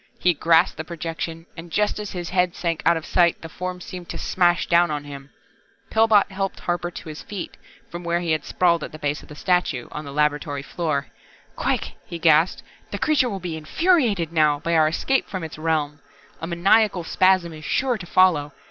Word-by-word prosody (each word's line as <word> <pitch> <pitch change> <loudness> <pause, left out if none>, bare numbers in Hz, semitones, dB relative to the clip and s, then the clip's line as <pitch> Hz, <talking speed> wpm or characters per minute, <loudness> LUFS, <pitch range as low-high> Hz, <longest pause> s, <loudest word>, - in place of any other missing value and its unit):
He 180 - +3
grasped 165 +3 +3
the 160 - -4
projection 165 0 -5
and 170 0 -9
just 210 +4 0
as 210 -1 -5
his 175 -2 -5
head 180 -1 +1
sank 165 -2 -2
out 170 - +5
of 160 - -6
sight 170 -2 +2
the - - -5
Form 180 +2 -5
seemed 180 -1 -9
to - - -5
smash 175 -1 +2
down 175 0 +4
on 150 -1 -3
him. 140 -1 -10 0.6
Pillbot 220 -2 +4
helped 195 0 -3
Harper 175 0 -2
to 165 - -9
his 155 - -8
feet, 200 -4 -7 0.3
from 175 +1 -8
where 170 0 0
he 170 -2 -2
had 155 - 0
sprawled 170 -3 +1
at - - -7
the - - -7
base 145 0 -2
of - - -16
the 150 - -10
statue, 180 -8 0
on 150 - -6
the 140 - -8
laboratory 145 -1 0
floor. 150 -4 -2 0.5
"Quick," - - -1
he 170 - -7
gasped. 160 +1 +3 0.3
"The 200 - -4
Creature 275 +2 +2
will 195 -3 -4
be 175 -3 -4
infuriated 205 - +1
now, 150 -3 +3
by 170 +1 -1
our 160 -2 +5
escape 265 +12 0
from 185 -3 -4
Its 160 -1 -7
realm. 155 -2 -1 0.4
A 165 - -4
maniacal 185 +2 +3
spasm 185 -1 +2
is 155 -1 -10
sure 250 +3 0
to 180 - -8
follow. 165 -6 +3
170 Hz, 205 wpm, -23 LUFS, 155-185 Hz, 0.6 s, out